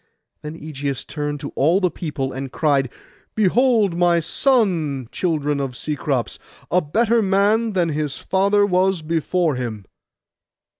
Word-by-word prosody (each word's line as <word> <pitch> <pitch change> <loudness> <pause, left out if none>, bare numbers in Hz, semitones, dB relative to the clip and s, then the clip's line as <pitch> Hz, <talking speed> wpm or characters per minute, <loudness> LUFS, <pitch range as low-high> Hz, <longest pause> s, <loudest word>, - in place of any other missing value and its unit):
Then 150 +2 -8
Ægeus 140 -3 -4
turned 145 -1 -4
to - - -5
all 165 +7 +2
the 180 -3 +1
people, 145 -6 -4
and 135 0 -5
cried, 140 -3 +1 0.5
'Behold 220 -2 +3
my 175 -1 +3
son, 165 - +1
children 150 -5 -1
of 135 -3 -4
Cecrops, 145 -4 -2 0.3
a 180 - +3
better 225 +9 +2
man 205 +3 +2
than 175 -3 +1
his 150 -2 -2
father 200 +2 +2
was 185 -2 +1
before 165 -1 0
him. 110 -5 -5
165 Hz, 135 wpm, -21 LUFS, 145-195 Hz, 0.5 s, Behold